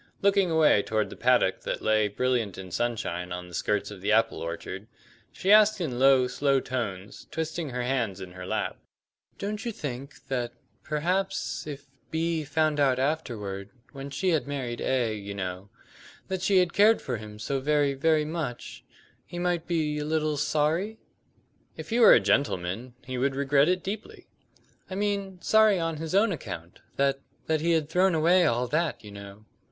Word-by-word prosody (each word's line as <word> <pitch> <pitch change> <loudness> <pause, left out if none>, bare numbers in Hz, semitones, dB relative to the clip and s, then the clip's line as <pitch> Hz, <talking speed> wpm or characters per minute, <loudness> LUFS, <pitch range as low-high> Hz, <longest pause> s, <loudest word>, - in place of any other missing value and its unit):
Looking 200 -2 +4
away 160 -9 +4
toward 110 +1 -1
the - - -8
paddock - - +2
that - - -3
lay 110 -1 +3
brilliant 115 -2 -1
in 95 -1 -8
sunshine 90 -6 -2
on 90 0 -5
the 90 - -14
skirts 105 +4 -1
of 100 -3 -10
the 100 +2 0
apple 115 +1 +3
orchard, 85 +5 -6 0.4
she 190 - 0
asked 215 0 +6
in 135 -9 -3
low 135 -1 +5
slow 140 +1 +1
tones, 105 -7 -5
twisting 160 -1 -3
her 125 -1 -3
hands 120 -7 -1
in 95 -1 -8
her 90 0 -8
lap: - - -2 0.6
"Don't 210 +2 -4
you 235 - -2
think 140 - -7
that 120 -2 -2 0.3
perhaps 180 +5 -1
if 145 -1 -7 0.2
B 165 0 -1
found 155 0 +1
out 135 -3 +3
afterward 115 -9 -2 0.2
when 140 -1 -7
she 185 +7 -1
had 155 -7 +1
married 130 -4 -4
A, 125 -4 +1
you 100 -1 -6
know 95 0 -5 0.6
that 190 -1 -2
she 190 +1 +3
had 180 -2 +3
cared 215 +2 +5
for 125 -3 -3
him 105 0 -10
so 135 +6 -2
very, 145 0 +2
very 155 +2 +2
much, 155 -6 -5 0.4
he 175 - -9
might 175 -1 -1
be 155 -3 0
a - - -2
little 155 0 0
sorry?" 160 +9 0 0.8
"If - - -8
he 235 - +2
were 235 - +9
a - - +6
gentleman 105 +1 0
he 130 0 -4
would 135 +1 +1
regret 140 +2 +3
it 185 0 0
deeply." 205 +3 -6 0.6
"I 185 - -5
mean 200 -2 -2
sorry 220 -3 +5
on 165 -1 -2
his 160 +3 -3
own 205 +2 +4
account; 85 - -7 0.2
that 135 0 +1 0.3
that 155 -1 0
he 170 +1 +2
had 160 -3 +1
thrown 180 +2 +3
away 175 +3 +4
all 120 +2 +1
that, 160 -3 -1
you 105 - -10
know?" 100 +1 -11
140 Hz, 180 wpm, -27 LUFS, 110-170 Hz, 0.8 s, were